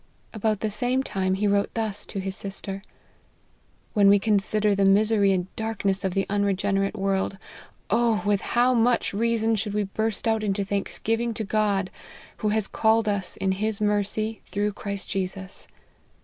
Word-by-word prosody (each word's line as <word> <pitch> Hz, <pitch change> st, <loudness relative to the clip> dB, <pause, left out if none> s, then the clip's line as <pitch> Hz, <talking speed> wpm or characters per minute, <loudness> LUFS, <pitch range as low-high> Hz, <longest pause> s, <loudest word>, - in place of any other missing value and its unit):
About 215 Hz, -1 st, -1 dB
the 215 Hz, -, -1 dB
same 250 Hz, +5 st, +1 dB
time 190 Hz, -5 st, -1 dB
he 205 Hz, +2 st, -1 dB
wrote 200 Hz, 0 st, +2 dB
thus 220 Hz, -3 st, -2 dB
to -, -, -7 dB
his 190 Hz, 0 st, -4 dB
sister: 195 Hz, 0 st, -4 dB, 0.6 s
" -, -, -38 dB
When 200 Hz, -1 st, +5 dB
we 200 Hz, -, +7 dB
consider 210 Hz, 0 st, +2 dB
the 200 Hz, 0 st, +1 dB
misery 200 Hz, +1 st, +4 dB
and 185 Hz, -1 st, -2 dB
darkness 205 Hz, -3 st, -1 dB
of 190 Hz, -2 st, -1 dB
the 195 Hz, -, +1 dB
unregenerate 200 Hz, 0 st, 0 dB
world, 195 Hz, 0 st, -1 dB, 0.5 s
oh! 230 Hz, -1 st, +2 dB
with 205 Hz, -1 st, +2 dB, 0.2 s
how 250 Hz, +1 st, +5 dB
much 240 Hz, -2 st, +2 dB
rea 230 Hz, +3 st, +1 dB
son 225 Hz, +1 st, +1 dB
should 210 Hz, -1 st, -1 dB
we 210 Hz, -, +1 dB
burst 220 Hz, +3 st, -2 dB
out 220 Hz, -1 st, +1 dB
into 200 Hz, -1 st, 0 dB
thanksgiving 225 Hz, +3 st, -1 dB
to 220 Hz, -, -3 dB
God, 200 Hz, -2 st, 0 dB, 0.5 s
who 215 Hz, -, -1 dB
has 215 Hz, -1 st, +2 dB
called 220 Hz, 0 st, +2 dB
us 200 Hz, -3 st, -1 dB
in 190 Hz, -, 0 dB
his 210 Hz, +2 st, -1 dB
mercy 210 Hz, +1 st, 0 dB
through 205 Hz, +2 st, -1 dB
Christ 200 Hz, 0 st, -6 dB
Jesus 190 Hz, 0 st, -4 dB
205 Hz, 170 wpm, -25 LUFS, 195-220 Hz, 0.6 s, we